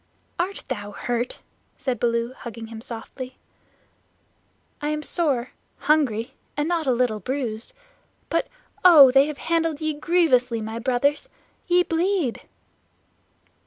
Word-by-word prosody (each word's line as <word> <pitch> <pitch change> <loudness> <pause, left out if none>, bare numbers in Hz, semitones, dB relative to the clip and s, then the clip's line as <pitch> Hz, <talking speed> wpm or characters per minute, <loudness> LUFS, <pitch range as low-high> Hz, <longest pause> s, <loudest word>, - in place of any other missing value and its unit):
"Art 375 +3 -2
thou 205 0 -5
hurt?" 240 +3 -2 0.4
said 255 -2 -2
Baloo, 235 +1 0
hugging 230 -3 -8
him 225 0 -9
softly. 250 +3 -8 1.4
"I 295 - -1
am 300 0 -2
sore, 275 -9 0 0.3
hungry, 265 -5 +1 0.2
and 295 +1 0
not 335 -3 0
a - - +4
little 240 -3 +1
bruised. 235 -1 -3 0.5
But, - - 0 0.4
oh, 305 -8 +9
they 270 +2 +5
have 300 -2 -5
handled 330 -2 0
ye 310 -1 -1
grievously, 290 -7 +2
my 220 +1 -5
Brothers! 275 - 0 0.4
Ye 355 0 +4
bleed." 335 - 0
265 Hz, 125 wpm, -24 LUFS, 235-315 Hz, 1.4 s, oh